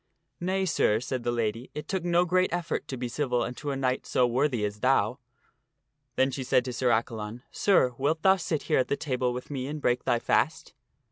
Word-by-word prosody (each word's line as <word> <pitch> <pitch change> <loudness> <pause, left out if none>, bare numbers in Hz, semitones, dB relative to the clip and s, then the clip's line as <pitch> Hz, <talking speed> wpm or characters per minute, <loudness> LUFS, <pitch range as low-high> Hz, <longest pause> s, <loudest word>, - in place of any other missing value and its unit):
" - - -51
Nay, 190 0 +1
sir," 110 - +2
said 125 +1 -3
the 120 - -1
lady, 115 +1 -2
" - - -46
it 150 +1 -6
took 190 -3 -2
no 175 0 +3
great 185 +1 +2
effort 175 -1 -2
to 130 - -5
be 125 0 -3
civil 125 -1 0
unto 145 +4 -5
a 140 - -1
knight 130 -1 -1
so 125 - +3
worthy 125 -2 +1
as 105 0 -5
thou." 125 0 +2 1.0
Then 135 +1 +2
she 130 +1 -4
said 125 0 +2
to 125 - -4
Sir 125 +1 +1
Accalon, 115 0 -1
" - - -44
Sir, 155 -11 +3
wilt 155 +4 0
thou 190 0 +6
sit 165 -4 -2
here - - +2
at 130 - +1
the 140 - -1
table 130 -5 -1
with 125 +3 -6
me 130 -2 -3
and 150 +2 -4
break 125 -3 +1
thy 120 - +2
fast 160 +7 0
130 Hz, 230 wpm, -28 LUFS, 120-155 Hz, 1.0 s, thou